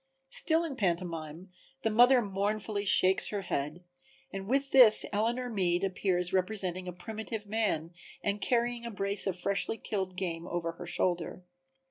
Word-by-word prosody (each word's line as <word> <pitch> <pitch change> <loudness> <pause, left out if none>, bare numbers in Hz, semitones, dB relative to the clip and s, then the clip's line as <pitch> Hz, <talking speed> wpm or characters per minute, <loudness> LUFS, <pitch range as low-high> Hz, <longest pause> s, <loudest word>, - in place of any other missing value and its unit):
Still 325 +1 +3
in 295 -6 -5
pantomime 170 -2 -3 0.3
the 225 - +1
mother 245 +3 +5
mournfully 205 +1 -2
shakes 190 -1 +4
her 205 -1 -3
head, 150 0 -3 0.5
and 195 0 -6
with 275 +1 0
this 245 -5 +8
Eleanor 235 +4 0
Meade 185 -6 0
appears 180 -2 -1
representing 185 -1 -1
a - - -3
primitive 220 +3 -6
man 200 -6 -2 0.3
and 205 0 -1
carrying 240 0 0
a 235 - -5
brace 200 -1 -1
of 185 -2 -1
freshly 200 +4 0
killed 190 -5 -4
game 175 -2 -4
over 170 -1 -3
her 170 +1 -10
shoulder. 175 0 -1
195 Hz, 150 wpm, -30 LUFS, 180-220 Hz, 0.5 s, this